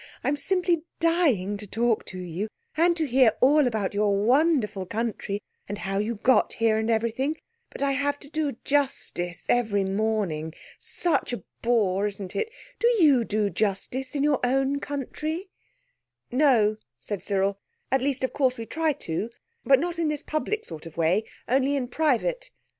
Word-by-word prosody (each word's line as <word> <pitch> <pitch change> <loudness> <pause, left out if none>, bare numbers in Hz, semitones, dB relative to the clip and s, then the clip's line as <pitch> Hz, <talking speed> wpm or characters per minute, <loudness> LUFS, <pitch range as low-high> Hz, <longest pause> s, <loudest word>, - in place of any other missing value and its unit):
"I'm 285 - +1
simply 355 +2 +1 0.2
dying 285 - +2
to 210 0 -8
talk 230 +2 0
to 185 - -6
you, 180 +3 -4 0.3
and 340 +2 +3
to 320 - +1
hear 255 -4 +4
all 285 +1 +5
about 215 -5 -1
your 205 0 +2
wonderful 240 - +2
country 210 -2 -3 0.3
and 205 - -3
how 195 -1 -2
you 220 +3 -1
got 250 +5 +3
here, 225 -1 +2
and 220 +1 -1
everything, 235 +7 0 0.3
but - - -5
I 280 - +2
have 285 +1 0
to 285 - -11
do 310 -2 -1
justice 260 -11 0
every 220 -5 +2
morning. 195 -6 -1 0.2
Such 340 -7 0
a 240 - -4 0.2
bore, 210 -4 +2
isn't 200 -2 -6
it? 445 +1 -1 0.3
Do 470 - +3
you 285 -8 +5
do 210 -2 0
justice 235 +6 -1
in 285 - +1
your 290 -2 +3
own 270 +2 +1
country?" 310 +6 -4 0.8
"No," 240 -6 +4 0.2
said 185 - -4
Cyril; 195 0 0 0.3
"at 265 0 +3
least 270 -1 -1
of 260 - -1
course 260 -3 +1
we 230 - -5
try 315 +4 0
to, 210 - -3 0.3
but 270 -1 +5
not 345 +2 -2
in 330 - +1
this 300 -1 -2
public 360 +8 -2
sort 160 -1 -8
of 165 - -13
way, 175 +6 +2 0.2
only 270 +3 +2
in 260 -3 -1
private." 320 - 0
245 Hz, 170 wpm, -26 LUFS, 205-290 Hz, 0.8 s, all